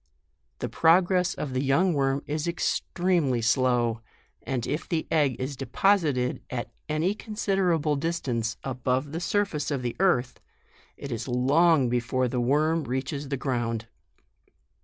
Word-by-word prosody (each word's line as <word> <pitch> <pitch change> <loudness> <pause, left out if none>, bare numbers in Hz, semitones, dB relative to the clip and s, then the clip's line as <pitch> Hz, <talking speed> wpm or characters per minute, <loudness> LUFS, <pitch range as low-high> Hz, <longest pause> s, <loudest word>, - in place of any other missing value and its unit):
The - - -3
progress 180 +2 +3
of 140 -3 -4
the 130 - 0
young 165 +7 +2
worm 135 -1 0
is 150 +2 -2
extremely 170 -5 0
slow; 120 -1 +1 0.4
and 125 -3 -3
if 150 +2 -3
the 165 -3 -1
egg 145 -5 +2
is 130 +2 -3
deposited 135 - +1
at 120 -2 -4 0.2
any 155 +6 +1
considerable 190 -8 0
distance 135 -7 -2
above 130 +2 -1
the 165 - -3
surface 180 -5 -1
of 140 -4 -2
the 120 - -2
earth, 155 -10 +1 0.6
it 140 - -7
is 115 +1 -4
long 140 +4 +3
be 120 +1 +1
fore 130 +2 0
the 125 0 -1
worm 155 +6 +2
reaches 135 +3 -3
the 140 - -1
ground. 120 -4 -2
140 Hz, 140 wpm, -26 LUFS, 125-165 Hz, 0.6 s, progress